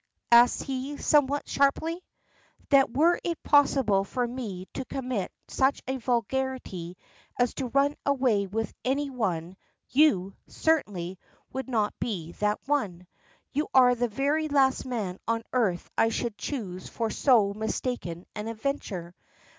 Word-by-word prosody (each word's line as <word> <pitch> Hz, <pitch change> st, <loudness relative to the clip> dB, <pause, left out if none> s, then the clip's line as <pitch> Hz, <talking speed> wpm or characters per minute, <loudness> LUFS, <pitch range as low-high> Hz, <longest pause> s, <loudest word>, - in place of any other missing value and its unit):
ask 240 Hz, +1 st, +6 dB
he, 270 Hz, +2 st, -4 dB
somewhat 290 Hz, -1 st, +2 dB
sharply. 320 Hz, +5 st, +1 dB, 0.7 s
"That 275 Hz, -3 st, +5 dB
were 335 Hz, +4 st, +4 dB
it 340 Hz, -2 st, -3 dB
possible 270 Hz, -9 st, +4 dB
for 245 Hz, +5 st, -2 dB
me 220 Hz, -7 st, -5 dB
to 265 Hz, -, -3 dB
commit 250 Hz, -8 st, -3 dB, 0.2 s
such 270 Hz, +1 st, +1 dB
a 265 Hz, 0 st, -1 dB
vulgarity 240 Hz, -7 st, -2 dB, 0.4 s
as 245 Hz, -1 st, +2 dB
to 265 Hz, -, -3 dB
run 280 Hz, +3 st, +2 dB
away 250 Hz, -8 st, +2 dB
with 225 Hz, +3 st, -3 dB
any 275 Hz, +2 st, 0 dB
one, 185 Hz, -7 st, -2 dB, 0.3 s
you, 195 Hz, -10 st, +3 dB
certainly, 190 Hz, -, -1 dB, 0.3 s
would 265 Hz, -1 st, -4 dB
not 215 Hz, -4 st, +1 dB
be 175 Hz, -8 st, -3 dB
that 210 Hz, 0 st, +1 dB
one. 205 Hz, -12 st, -1 dB, 0.5 s
You 295 Hz, +2 st, -1 dB
are 250 Hz, -1 st, +7 dB
the 245 Hz, 0 st, 0 dB
very 285 Hz, +7 st, 0 dB
last 275 Hz, -3 st, +2 dB
man 205 Hz, -7 st, -3 dB
on 230 Hz, 0 st, 0 dB
earth 205 Hz, -9 st, +1 dB
I 225 Hz, -, +3 dB
should 230 Hz, -1 st, -2 dB
choose 185 Hz, -3 st, -5 dB
for 225 Hz, -2 st, -2 dB
so 220 Hz, -7 st, +4 dB
mistaken 215 Hz, -5 st, -3 dB
an 210 Hz, +1 st, -5 dB
adventure. 220 Hz, -7 st, -4 dB
245 Hz, 140 wpm, -27 LUFS, 200-275 Hz, 0.7 s, are